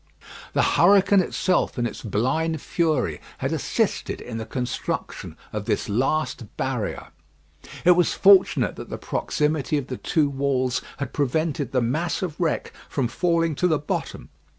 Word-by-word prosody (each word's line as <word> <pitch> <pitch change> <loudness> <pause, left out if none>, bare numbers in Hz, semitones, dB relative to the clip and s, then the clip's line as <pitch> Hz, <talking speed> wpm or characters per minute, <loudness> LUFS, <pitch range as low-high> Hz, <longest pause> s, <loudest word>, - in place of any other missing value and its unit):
The - - +3
hurricane 195 +2 +5
itself, 185 -2 0
in 120 - 0
its - - -5
blind 135 +10 0
fury, 160 +1 0 0.2
had - - -2
assisted - - -1
in 115 -2 -6
the 110 - -6
construction 125 +1 -4 0.2
of - - -3
this - - -1
last 125 0 -1
barrier. 125 -6 -3 0.8
It 180 - +8
was 175 -1 +3
fortunate 195 -1 +5
that - - -8
the - - -4
proximity 150 -1 -1
of 140 -2 -4
the 130 - -4
two 155 -3 +1
walls 135 -2 0 0.2
had 140 -3 -5
prevented 145 -1 -1
the 125 - +2
mass 165 +9 -1
of 165 -4 -4
wreck 165 -3 -1 0.2
from 135 -4 0
falling 165 +5 +1
to 180 - +3
the 160 -3 +2
bottom. 145 - -4
150 Hz, 150 wpm, -24 LUFS, 125-165 Hz, 0.8 s, It